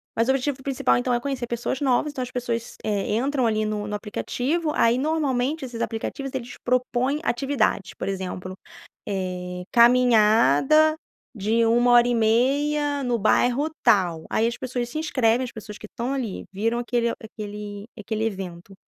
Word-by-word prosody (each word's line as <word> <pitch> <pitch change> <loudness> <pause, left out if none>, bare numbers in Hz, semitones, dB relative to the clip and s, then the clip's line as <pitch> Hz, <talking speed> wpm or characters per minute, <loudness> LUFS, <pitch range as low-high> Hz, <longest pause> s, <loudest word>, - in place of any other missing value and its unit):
mas 230 +2 +1
o - - +7
objetivo 270 0 -1
principal 255 - +1
então 125 - 0
é 240 - +2
conhecer 260 -2 -3
pessoas 240 +3 -3
novas 275 +2 +2
então 260 - -5
as 250 0 -5
pessoas, 235 -2 -3
eh, 210 0 -1
entram 265 +1 0
ali 215 -1 +1
no 210 -1 -3
no 210 - -3
aplicativo, 270 +9 -2
aí 230 +2 +3
normalmente 285 -1 0
esses 235 -2 -6
aplicativos 260 +4 -4
eles 245 -2 -5
propõem 255 +3 0
atividades 240 - 0
por - - -6
exemplo, 185 -1 -5 0.5
eh, 180 -2 -4
caminhada 240 - +5 0.4
de 225 +2 +1
1 240 +2 +4
hora 240 0 +6
e 240 - +1
meia 285 +6 +1
no 245 -1 +1
bairro 245 +8 +2
tal, 180 -8 +3
aí 225 - +1
as 235 - -4
pessoas 245 -2 -3
se 310 - -5
inscrevem, 255 -5 +1
as 245 - -7
pessoas 210 -1 -9
que 215 - -9
estão 240 +5 -4
ali 245 -8 -3
viram 225 +5 0
aquele 235 -1 0
aquele 210 -1 -7
aquele 220 +1 -3
evento 190 -3 -5
235 Hz, 165 wpm, -24 LUFS, 210-260 Hz, 0.5 s, o